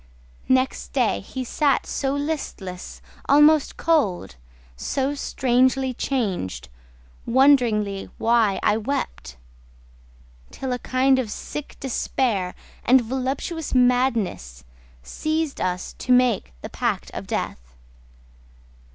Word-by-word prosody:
Next 260 Hz, +1 st, +1 dB
day -, -, +2 dB
he 260 Hz, -, -6 dB
sat 280 Hz, +2 st, +1 dB
so 270 Hz, 0 st, -2 dB
listless, 280 Hz, -, -5 dB, 0.3 s
almost 295 Hz, +1 st, +5 dB
cold 285 Hz, -, +1 dB, 0.4 s
So 270 Hz, -, -1 dB
strangely 260 Hz, -1 st, +1 dB
changed, 215 Hz, -, -2 dB, 0.6 s
wondering 235 Hz, -6 st, +3 dB
why 225 Hz, -4 st, +2 dB
I 210 Hz, -, +3 dB
wept, 225 Hz, -, -4 dB, 1.1 s
Till 260 Hz, -2 st, -4 dB
a 250 Hz, -, -3 dB
kind 260 Hz, +1 st, +2 dB
of 240 Hz, -4 st, -2 dB
sick 295 Hz, +6 st, -7 dB
despair 230 Hz, -7 st, -1 dB, 0.3 s
and 255 Hz, +1 st, +5 dB
voluptuous 265 Hz, +6 st, -3 dB
madness 235 Hz, -, +1 dB, 0.4 s
Seized 310 Hz, -, -2 dB
us 185 Hz, 0 st, -2 dB
to 255 Hz, -, -2 dB
make 250 Hz, -, +3 dB
the -, -, -5 dB
pact -, -, -2 dB
of -, -, -7 dB
death. -, -, -4 dB
255 Hz, 100 wpm, -23 LUFS, 210-275 Hz, 1.1 s, almost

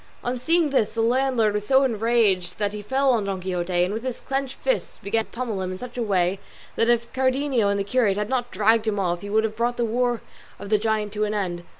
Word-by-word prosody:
On 245 Hz, +1 st, -1 dB
seeing 315 Hz, +5 st, +2 dB
this 235 Hz, -6 st, +1 dB
the 225 Hz, -, +1 dB
landlord 240 Hz, -2 st, +2 dB
was 210 Hz, 0 st, -3 dB
so 270 Hz, 0 st, +5 dB
enraged 225 Hz, -6 st, +1 dB
that 205 Hz, -1 st, -1 dB
he 210 Hz, -, -5 dB
fell 265 Hz, +5 st, +2 dB
on 225 Hz, -5 st, +1 dB
Don 195 Hz, -1 st, -2 dB
Quixote, 180 Hz, -1 st, -1 dB
and 185 Hz, +3 st, -1 dB
with 220 Hz, -, -3 dB
his 255 Hz, -1 st, -4 dB
clenched 270 Hz, -1 st, -3 dB
fist -, -, -2 dB
began 220 Hz, +3 st, 0 dB
to -, -, -25 dB
pummel 230 Hz, -5 st, -3 dB
him 185 Hz, 0 st, -3 dB
in 185 Hz, -, -5 dB
such 245 Hz, +3 st, -9 dB
a 245 Hz, -, -2 dB
way, 190 Hz, -3 st, +1 dB, 0.4 s
that 230 Hz, -, +2 dB
if 235 Hz, 0 st, +1 dB
Cardenio 260 Hz, -4 st, +1 dB
and 200 Hz, 0 st, 0 dB
the -, -, 0 dB
curate 205 Hz, -2 st, +1 dB
had 210 Hz, 0 st, -1 dB
not 245 Hz, 0 st, -1 dB
dragged 220 Hz, +2 st, +2 dB
him 210 Hz, -1 st, 0 dB
off, 175 Hz, -3 st, -1 dB
he 205 Hz, -, -7 dB
would 220 Hz, +1 st, +2 dB
have 220 Hz, -1 st, -2 dB
brought 240 Hz, +2 st, -1 dB
the 240 Hz, -, +1 dB
war 240 Hz, 0 st, 0 dB, 0.4 s
of 200 Hz, -, -9 dB
the 215 Hz, -, +4 dB
giant 215 Hz, -1 st, -1 dB
to 210 Hz, 0 st, -1 dB
an 210 Hz, 0 st, -2 dB
end. 175 Hz, -4 st, -2 dB
220 Hz, 255 wpm, -24 LUFS, 200-250 Hz, 0.4 s, so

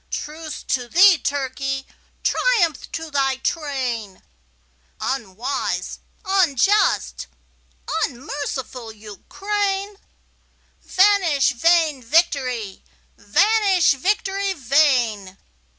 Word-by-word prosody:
Truce 310 Hz, +1 st, -6 dB
to 250 Hz, -2 st, -2 dB
thee, 360 Hz, +4 st, +6 dB
Turkey! 270 Hz, -1 st, -3 dB, 0.4 s
Triumph 365 Hz, -, +1 dB
to 320 Hz, -1 st, -5 dB
thy 270 Hz, -2 st, +1 dB
train, 260 Hz, -, -4 dB, 0.8 s
Unwise, 250 Hz, +1 st, -3 dB, 0.3 s
unjust, 385 Hz, -, +2 dB, 0.8 s
unmerciful 260 Hz, -2 st, -6 dB
Ukraine! 390 Hz, -, -4 dB, 0.8 s
Vanish 370 Hz, -9 st, +3 dB
vain 315 Hz, +1 st, +2 dB
victory! 250 Hz, -, 0 dB, 0.3 s
vanish, 395 Hz, -, +3 dB
victory 390 Hz, +6 st, -1 dB
vain! 245 Hz, -, +1 dB
285 Hz, 70 wpm, -21 LUFS, 250-375 Hz, 0.8 s, thee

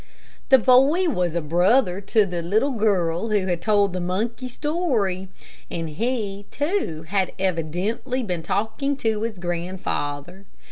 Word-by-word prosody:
The 265 Hz, -, +8 dB
boy 270 Hz, +9 st, +4 dB
was 180 Hz, -, -1 dB
a 170 Hz, -, +1 dB
brother 180 Hz, -, +2 dB
to 210 Hz, +1 st, +3 dB
the 175 Hz, -2 st, -3 dB
little 215 Hz, +11 st, +1 dB
girl 200 Hz, -4 st, +1 dB
who 205 Hz, -3 st, +1 dB
had 175 Hz, -2 st, -1 dB
told 205 Hz, -2 st, +2 dB
the 185 Hz, -, -2 dB
monkey 225 Hz, +8 st, -2 dB
story, 245 Hz, -, -1 dB, 0.4 s
and 165 Hz, -2 st, -4 dB
he, 205 Hz, +1 st, -3 dB
too, 290 Hz, -, -2 dB
had 190 Hz, +3 st, -1 dB
evidently 190 Hz, -, -1 dB
been 180 Hz, -6 st, -2 dB
talking 225 Hz, -, -1 dB
to 220 Hz, -5 st, 0 dB
his 225 Hz, -2 st, -3 dB
grandfather. 175 Hz, -1 st, -4 dB
200 Hz, 140 wpm, -23 LUFS, 175-240 Hz, 0.4 s, The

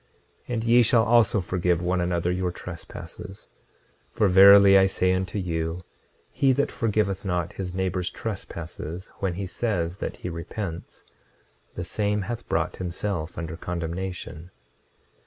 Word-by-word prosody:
26:31 125 Hz, -, -4 dB
And 110 Hz, -, -2 dB
ye 120 Hz, +1 st, +5 dB
shall 115 Hz, 0 st, +4 dB
also 115 Hz, -3 st, +4 dB
forgive 90 Hz, -1 st, 0 dB
one 90 Hz, 0 st, +1 dB
another 85 Hz, 0 st, 0 dB
your 90 Hz, 0 st, -1 dB
trespasses; 90 Hz, +2 st, -9 dB, 0.6 s
for 105 Hz, -, +2 dB
verily 100 Hz, +1 st, +8 dB
I 95 Hz, 0 st, +6 dB
say 95 Hz, -1 st, +1 dB
unto 95 Hz, +1 st, -2 dB
you, 85 Hz, -1 st, -2 dB, 0.5 s
he 135 Hz, -1 st, +3 dB
that 140 Hz, +2 st, 0 dB
forgiveth 105 Hz, -5 st, 0 dB
not 90 Hz, -3 st, -2 dB
his 90 Hz, -2 st, -5 dB
neighbor's 90 Hz, -1 st, -1 dB
trespasses 85 Hz, -4 st, -6 dB
when 95 Hz, -3 st, -1 dB
he 95 Hz, +2 st, -3 dB
says 90 Hz, -4 st, -2 dB
that -, -, -4 dB
he -, -, -6 dB
repents, 85 Hz, +1 st, -6 dB, 0.7 s
the 90 Hz, -, -4 dB
same 105 Hz, +3 st, -1 dB
hath 115 Hz, +3 st, -6 dB
brought -, -, -1 dB
himself 90 Hz, -2 st, -4 dB
under 80 Hz, -1 st, -4 dB
condemnation. 90 Hz, 0 st, -5 dB
95 Hz, 140 wpm, -25 LUFS, 85-100 Hz, 0.7 s, verily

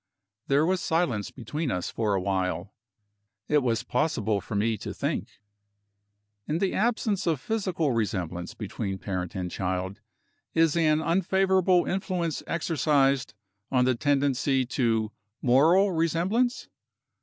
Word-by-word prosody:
There 140 Hz, +3 st, +3 dB
was 185 Hz, 0 st, +1 dB
silence 150 Hz, -, 0 dB
between 145 Hz, +5 st, -4 dB
us 90 Hz, -5 st, -2 dB
for 105 Hz, -3 st, 0 dB
a -, -, +1 dB
while. 95 Hz, 0 st, -2 dB, 0.7 s
It 150 Hz, -, +4 dB
was 115 Hz, -3 st, 0 dB
possible 110 Hz, -7 st, 0 dB
for 105 Hz, -, -6 dB
me 110 Hz, +2 st, +1 dB
to -, -, -6 dB
think. -, -, -3 dB, 1.1 s
In 155 Hz, -, 0 dB
the 190 Hz, +2 st, 0 dB
absence 215 Hz, -3 st, 0 dB
of 160 Hz, -5 st, +1 dB
physical 185 Hz, -, -1 dB
resemblance 90 Hz, -6 st, -2 dB
between 105 Hz, -2 st, -4 dB
parent 90 Hz, -1 st, -4 dB
and 90 Hz, -2 st, -3 dB
child, 95 Hz, +2 st, -3 dB, 0.5 s
is 165 Hz, -1 st, +4 dB
an 155 Hz, -2 st, +3 dB
unfavorable 190 Hz, +1 st, +3 dB
influence 180 Hz, -4 st, -2 dB
exercised 140 Hz, -6 st, +1 dB, 0.4 s
on 125 Hz, -2 st, +3 dB
the 130 Hz, -, +3 dB
tendency 135 Hz, 0 st, +1 dB
to 115 Hz, -3 st, 0 dB, 0.3 s
moral 160 Hz, +11 st, +4 dB
resemblance? 180 Hz, -, 0 dB
140 Hz, 125 wpm, -27 LUFS, 110-170 Hz, 1.1 s, It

